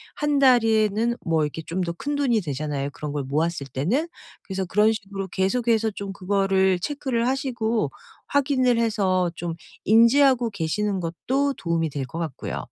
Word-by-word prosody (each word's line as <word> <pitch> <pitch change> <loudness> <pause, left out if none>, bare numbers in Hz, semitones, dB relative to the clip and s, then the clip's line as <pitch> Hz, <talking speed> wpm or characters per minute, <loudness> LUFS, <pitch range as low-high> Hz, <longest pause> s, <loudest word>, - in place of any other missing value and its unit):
1 295 -1 +1
달에는 225 -3 +3
뭐 160 -2 +2
이렇게 155 +2 -5
좀 175 +3 -3
더 170 -1 -2
큰 290 +11 -3
돈이 240 -7 +2
되잖아요, 145 -2 -3
그런 150 0 -6
걸 145 -2 -2
모았을 150 +1 -1
때는? 230 - -1 0.3
그래서 190 -1 -3
그런 210 +4 +3
식으로 195 -2 -6
계속해서 220 +3 +1
좀 200 -1 -5
그거를 190 -1 +1
체크를 255 -1 -1
하시고 235 - -1 0.4
확인을 260 -4 +2
해서 190 -6 +1
좀 170 -1 -4 0.3
인지하고 235 +3 +5
계시는 200 +3 -1
것도 265 +12 -1
도움이 165 -2 -1
될 140 -1 -4
것 160 +7 -7
같고요. 160 -6 -4
200 Hz, 325 characters per minute, -24 LUFS, 170-240 Hz, 0.4 s, 인지하고